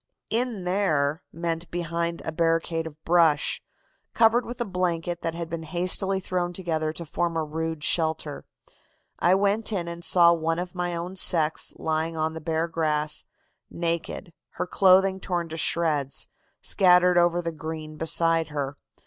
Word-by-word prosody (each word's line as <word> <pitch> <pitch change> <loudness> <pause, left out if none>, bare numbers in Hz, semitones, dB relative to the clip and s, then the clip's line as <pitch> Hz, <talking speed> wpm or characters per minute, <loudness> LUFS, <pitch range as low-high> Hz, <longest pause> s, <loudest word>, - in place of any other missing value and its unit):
"'In 230 -3 -1
there' 160 -5 +1
meant 165 0 -3
behind 170 0 -3
a - - -2
barricade 165 0 0
of 155 -1 -12
brush, 165 -4 +3 0.5
covered 230 +1 +4
with 240 +1 -7
a 240 - -1
blanket 175 -3 -2
that 165 0 -3
had 170 -1 -4
been 165 0 -5
hastily 185 +4 0
thrown 180 -1 -2
together 160 -4 -2
to 170 +2 -7
form 170 +2 -1
a 160 - 0
rude 160 0 -4
shelter. 160 -3 +1 0.8
I 180 +2 +4
went 205 +3 +1
in 180 -5 -2
and 170 0 -7
saw 170 -1 +6
one 165 0 -1
of 175 0 -4
my 175 -1 -2
own 175 +3 -5
sex 160 -3 +3
lying 160 +1 -2
on 160 0 -1
the 160 - -7
bare 160 +1 -1
grass 155 -2 -1 0.4
naked, 170 0 -3 0.2
her - - -2
clothing 190 +1 +4
torn 175 -3 -2
to 160 - -6
shreds; 155 -5 0 0.3
scattered 180 -1 +5
over 175 0 +3
the 170 -1 -3
green 155 -1 -7
beside 165 +1 +2
her. 145 -2 -4
170 Hz, 155 wpm, -25 LUFS, 160-180 Hz, 0.8 s, saw